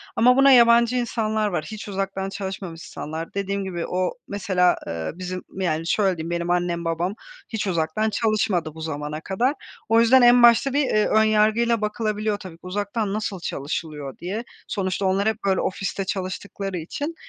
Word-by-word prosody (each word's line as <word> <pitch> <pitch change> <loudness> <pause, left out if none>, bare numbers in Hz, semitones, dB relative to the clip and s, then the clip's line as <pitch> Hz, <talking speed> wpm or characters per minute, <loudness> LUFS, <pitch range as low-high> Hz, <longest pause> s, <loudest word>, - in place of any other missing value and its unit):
ama 250 +3 +5
buna 275 0 +7
yabancı 235 -1 +6
insanlar 220 -3 0
var, 175 -6 -2
hiç 215 -1 -7
uzaktan 195 0 -3
çalışmamış 190 -4 -6
insanlar. 160 +2 -6
Dediğim 200 0 -2
gibi 175 -3 -4
o 185 0 0 0.2
mesela, 185 -3 +2
ııı, 80 -1 -3
bizim 185 0 -5
yani 165 -3 -1
şöyle 195 -3 +2
diyeyim 160 +1 -5
benim 170 0 -2
annem 175 -1 0
babam 170 +4 -1 0.3
hiç 220 -3 -3
uzaktan 175 +5 0
çalışmadı 200 -7 0
bu 160 - -9
zamana 150 0 -4
kadar. 235 - 0 0.4
O 225 +1 +5
yüzden 250 +3 +6
en 245 0 +7
başta 240 +3 +6
bir, 290 0 +3
eee, 215 -3 +2
ön 220 0 +4
yargıyla 220 +2 +3
bakılabiliyor 215 -1 -1
tabii, 185 -5 -10
uzaktan 205 +2 -2
nasıl 210 -3 -3
çalışılıyor 145 -2 -5
diye. 195 +7 -4 0.2
Sonuçta 190 0 -2
onlar 195 +2 +2
hep, 220 -1 +1
böyle, 190 -1 +2
ofiste 195 +1 -2
çalıştıkları 190 0 -4
için. 285 - -5
195 Hz, 165 wpm, -23 LUFS, 175-220 Hz, 0.4 s, buna